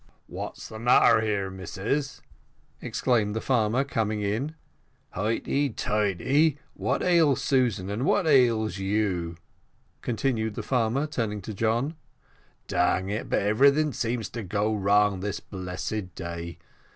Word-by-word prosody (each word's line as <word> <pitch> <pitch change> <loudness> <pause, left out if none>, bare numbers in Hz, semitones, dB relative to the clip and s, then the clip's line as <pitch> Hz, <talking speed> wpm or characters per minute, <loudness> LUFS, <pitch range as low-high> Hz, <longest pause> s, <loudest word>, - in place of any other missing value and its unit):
"What's - - -7
the 110 - -9
matter 115 -1 +5
here, 100 -3 -1
missus?" 110 +9 -3 0.6
exclaimed 110 -5 0
the - - 0
farmer, 120 +1 +1
coming 110 -6 -1
in. 120 +10 -2 0.6
"Highty 115 +8 0
tighty, 110 - +1 0.2
what - - -1
ails 165 -7 +3
Susan, 120 -9 +1
and 110 +5 -2
what 185 +5 +2
ails 115 -8 +3
you?" 95 -4 -1 0.6
continued 110 -2 -1
the - - -4
farmer, 125 +2 +1
turning 110 -9 -3
to 110 - -6
John. 115 +8 0 0.7
"Dang 95 +1 +1
it, 105 +2 -3
but - - +1
everything 140 +8 +4
seems 115 -1 -2
to 120 - -5
go 105 +2 -1
wrong 100 -1 +3
this 100 +1 -3
blessed 95 0 -5
day. 85 -1 -6
110 Hz, 125 wpm, -26 LUFS, 100-130 Hz, 0.7 s, matter